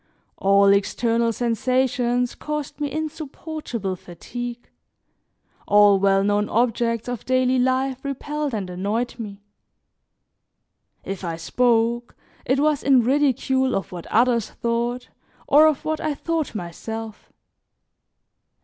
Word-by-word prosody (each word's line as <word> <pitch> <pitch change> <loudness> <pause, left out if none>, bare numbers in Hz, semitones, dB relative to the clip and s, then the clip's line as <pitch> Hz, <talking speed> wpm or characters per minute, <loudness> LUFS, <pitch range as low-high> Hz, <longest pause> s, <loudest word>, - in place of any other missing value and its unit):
All 200 0 +5
external 230 +4 +1
sensations 245 +1 0
caused 300 -1 -5
me 290 -1 -1
insupportable 310 - -4
fatigue, 240 +8 -7 1.0
all 205 -1 +6
well 195 0 +3
known 205 +1 +1
objects 230 0 0
of 245 -3 -4
daily 255 0 +2
life 260 +1 0
repelled 290 0 -3
and 200 -3 -3
annoyed 205 +7 -3
me; 200 -2 -7 1.6
if 195 -1 -6
I 170 -2 -3
spoke, 235 +6 +1 0.3
it 260 +2 +1
was 300 -1 +2
in 265 -3 +4
ridicule 265 0 +2
of 195 - -3
what 175 -2 -8
others 235 -1 +2
thought 235 +1 -2 0.4
or 305 +2 +7
of 305 -2 0
what 315 0 -1
I 305 -2 -1
thought 320 -4 -2
myself. 215 +5 -7
240 Hz, 115 wpm, -23 LUFS, 210-270 Hz, 1.6 s, or